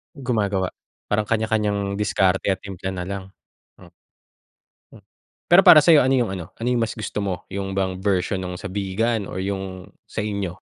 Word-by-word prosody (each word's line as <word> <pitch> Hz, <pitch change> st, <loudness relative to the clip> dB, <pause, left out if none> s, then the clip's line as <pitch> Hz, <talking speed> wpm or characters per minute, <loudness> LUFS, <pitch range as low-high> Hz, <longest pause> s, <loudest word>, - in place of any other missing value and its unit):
Gumagawa. 105 Hz, -9 st, -1 dB, 0.4 s
Parang, 105 Hz, 0 st, +1 dB
kanya-kanyang 105 Hz, -2 st, 0 dB
diskarte, 95 Hz, -2 st, +1 dB
at 95 Hz, -1 st, 0 dB
timpla 95 Hz, -2 st, -6 dB
na 90 Hz, -, -4 dB
lang. 100 Hz, +1 st, -5 dB, 1.5 s
Oo. -, -, -20 dB, 0.5 s
Pero, 175 Hz, +2 st, +7 dB
para 155 Hz, -, +10 dB
sayo, 150 Hz, -1 st, +6 dB
ano 130 Hz, +1 st, +2 dB
yung 120 Hz, -5 st, +1 dB
ano 85 Hz, -3 st, -8 dB
ano 115 Hz, -, -3 dB
yung 125 Hz, -2 st, +2 dB
mas 115 Hz, -, -3 dB
gusto 105 Hz, -1 st, -4 dB
mo, 95 Hz, -3 st, -4 dB
yung 95 Hz, 0 st, -4 dB
bang 95 Hz, -1 st, -1 dB
version 95 Hz, -1 st, +1 dB
nung 90 Hz, 0 st, -5 dB
sa -, -, -6 dB
Vigan 100 Hz, +3 st, -1 dB
or 95 Hz, -, -4 dB
yung 95 Hz, -1 st, -5 dB, 0.2 s
sa -, -, -6 dB
inyo? 100 Hz, -4 st, -3 dB
100 Hz, 170 wpm, -22 LUFS, 95-110 Hz, 1.5 s, para